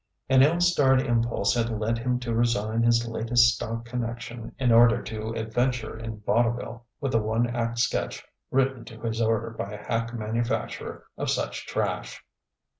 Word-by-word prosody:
An 130 Hz, -1 st, +6 dB
ill 155 Hz, +5 st, +4 dB
starred 145 Hz, -7 st, +4 dB
impulse 115 Hz, -3 st, +1 dB
had 115 Hz, -1 st, 0 dB
led 115 Hz, +1 st, -1 dB
him 125 Hz, +1 st, 0 dB
to 120 Hz, -2 st, -2 dB
resign 115 Hz, -1 st, +1 dB
his 115 Hz, 0 st, +3 dB
latest 115 Hz, +1 st, +3 dB
stock 115 Hz, +1 st, -5 dB
connection 115 Hz, -1 st, -5 dB
in 130 Hz, -3 st, +2 dB
order 115 Hz, 0 st, +6 dB
to 110 Hz, 0 st, -5 dB
adventure 120 Hz, +1 st, -1 dB
in 110 Hz, -1 st, -7 dB
vaudeville 120 Hz, +2 st, 0 dB
with 135 Hz, -2 st, -2 dB
a 115 Hz, -, +3 dB
one 110 Hz, +3 st, +1 dB
act 115 Hz, 0 st, -1 dB
sketch 115 Hz, -1 st, -1 dB, 0.2 s
written 135 Hz, -2 st, +1 dB
to 115 Hz, 0 st, -11 dB
his 115 Hz, 0 st, -2 dB
order 115 Hz, 0 st, +1 dB
by 105 Hz, -2 st, -5 dB
a -, -, -5 dB
hack 115 Hz, 0 st, -1 dB
manufacturer 115 Hz, +1 st, -3 dB, 0.2 s
of -, -, -1 dB
such -, -, -2 dB
trash. -, -, -3 dB
115 Hz, 165 wpm, -26 LUFS, 115-120 Hz, 0.2 s, An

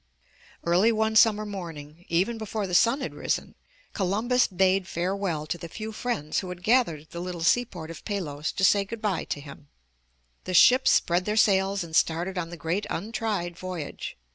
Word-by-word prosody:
Early 180 Hz, +7 st, +4 dB
one 220 Hz, 0 st, 0 dB
summer 215 Hz, -1 st, +5 dB
morning, 170 Hz, -5 st, -8 dB
even 190 Hz, +7 st, +1 dB
before 215 Hz, -1 st, -3 dB
the 180 Hz, -, -6 dB
sun 235 Hz, +9 st, +4 dB
had -, -, -4 dB
risen, -, -, -2 dB, 0.4 s
Columbus 220 Hz, +6 st, +1 dB
bade 190 Hz, 0 st, +2 dB
farewell 180 Hz, -3 st, -2 dB
to 155 Hz, +3 st, -4 dB
the 170 Hz, -, -8 dB
few 220 Hz, +5 st, -6 dB
friends 215 Hz, -9 st, -2 dB
who 185 Hz, -, -6 dB
had 180 Hz, 0 st, -8 dB
gathered 220 Hz, -, +2 dB
at 155 Hz, -, -22 dB
the 170 Hz, -, -6 dB
little 175 Hz, -1 st, -5 dB
seaport 175 Hz, -6 st, 0 dB
of 165 Hz, -, -10 dB
Palos 160 Hz, -8 st, -3 dB
to 195 Hz, -, -3 dB
say 200 Hz, +1 st, +5 dB
good 225 Hz, +3 st, -7 dB
bye 210 Hz, -5 st, -1 dB
to -, -, -4 dB
him. 145 Hz, 0 st, -12 dB, 0.8 s
The 185 Hz, -, -2 dB
ships 255 Hz, +8 st, +6 dB
spread 175 Hz, +1 st, +2 dB
their 210 Hz, +1 st, -1 dB
sails 195 Hz, -2 st, +3 dB
and 160 Hz, -1 st, -7 dB
started 170 Hz, +5 st, +1 dB
on 165 Hz, -1 st, -4 dB
the 175 Hz, -, -8 dB
great 165 Hz, +6 st, -2 dB
untried 205 Hz, -3 st, -3 dB
voyage. 180 Hz, -4 st, -6 dB
185 Hz, 185 wpm, -26 LUFS, 170-215 Hz, 0.8 s, ships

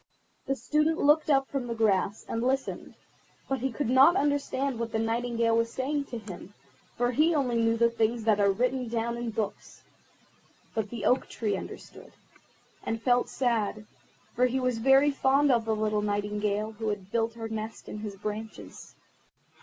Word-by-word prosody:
The 270 Hz, -, +1 dB
Student 305 Hz, +3 st, +1 dB
looked 300 Hz, +2 st, +3 dB
up 270 Hz, -2 st, +3 dB
from 270 Hz, -3 st, -3 dB
the 235 Hz, -, -3 dB
grass, 205 Hz, -2 st, +1 dB
and 230 Hz, -, -2 dB
listened, 265 Hz, +2 st, -2 dB, 0.5 s
but 270 Hz, -1 st, -1 dB
he 265 Hz, +1 st, -1 dB
could 260 Hz, +2 st, -2 dB
not 265 Hz, +8 st, +6 dB
understand 280 Hz, -4 st, 0 dB
what 230 Hz, -1 st, -3 dB
the -, -, +1 dB
Nightingale 230 Hz, 0 st, 0 dB
was 230 Hz, 0 st, +1 dB
saying 280 Hz, +3 st, -2 dB
to 245 Hz, -, -6 dB
him, 205 Hz, -2 st, -10 dB, 0.4 s
for 245 Hz, +1 st, +1 dB
he 315 Hz, +6 st, +3 dB
only 250 Hz, -5 st, +1 dB
knew 230 Hz, 0 st, +2 dB
the 235 Hz, 0 st, +3 dB
things 230 Hz, 0 st, 0 dB
that 215 Hz, -2 st, +3 dB
are 200 Hz, -1 st, +4 dB
written 250 Hz, +4 st, -1 dB
down 235 Hz, +1 st, -2 dB
in 235 Hz, 0 st, -4 dB
books. 220 Hz, -2 st, -5 dB, 0.9 s
But 220 Hz, -2 st, -2 dB
the 230 Hz, -3 st, -5 dB
Oak 255 Hz, -, +2 dB
tree 210 Hz, -3 st, -2 dB
understood, -, -, -9 dB, 0.7 s
and 225 Hz, -, -2 dB
felt 245 Hz, +1 st, +2 dB
sad, 220 Hz, -4 st, -1 dB, 0.5 s
for 250 Hz, +2 st, +4 dB
he 260 Hz, +2 st, -1 dB
was 250 Hz, -3 st, 0 dB
very 270 Hz, +4 st, +5 dB
fond 275 Hz, +1 st, +3 dB
of 235 Hz, -2 st, +2 dB
the 220 Hz, -1 st, 0 dB
little 215 Hz, -1 st, 0 dB
Nightingale 205 Hz, +1 st, -1 dB
who 220 Hz, 0 st, -5 dB
had 200 Hz, -2 st, -5 dB
built 230 Hz, 0 st, 0 dB
her 225 Hz, -1 st, -5 dB
nest 220 Hz, 0 st, -6 dB
in 210 Hz, -, -6 dB
his 210 Hz, -2 st, -6 dB
branches. 215 Hz, +2 st, -7 dB
230 Hz, 175 wpm, -28 LUFS, 215-265 Hz, 0.9 s, not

